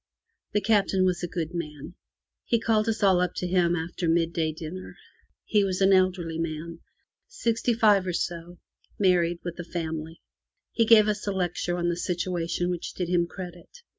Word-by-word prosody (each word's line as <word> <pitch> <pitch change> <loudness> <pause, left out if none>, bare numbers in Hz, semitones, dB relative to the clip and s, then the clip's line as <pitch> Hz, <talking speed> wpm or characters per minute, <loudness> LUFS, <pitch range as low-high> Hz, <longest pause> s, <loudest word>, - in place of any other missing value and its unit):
The 210 - +2
Captain 195 -3 +2
was 180 -2 0
a 175 - -2
good 170 -1 -4
man. 150 -2 -6 0.5
He 235 - +2
called 225 -1 +1
us 220 -1 -2
all 190 -2 +5
up 180 -1 -1
to - - -3
him 175 -1 +2
after 170 +1 -3
mid 165 0 +2
day 160 -2 0
dinner. 165 +4 -8 0.5
He 210 -2 +3
was 185 -2 -1
an 195 0 +5
elderly 180 -3 +1
man 165 +1 -4 0.2
— - - -56
sixty 235 - 0
five 205 -5 +4
or 180 - -1
so 175 +1 -4 0.2
— - - -36
married, 175 -3 +3
with 175 0 -6
a - - -3
family. 160 -1 -5 0.5
He 230 - +2
gave 220 -2 +7
us 210 0 -2
a - - +1
lecture 180 -1 -1
on 175 0 0
the 175 - 0
situation 175 0 -1
which 175 -2 -5
did 180 -2 -3
him 175 -1 +2
credit. 175 -1 -9
180 Hz, 190 wpm, -26 LUFS, 170-195 Hz, 0.5 s, gave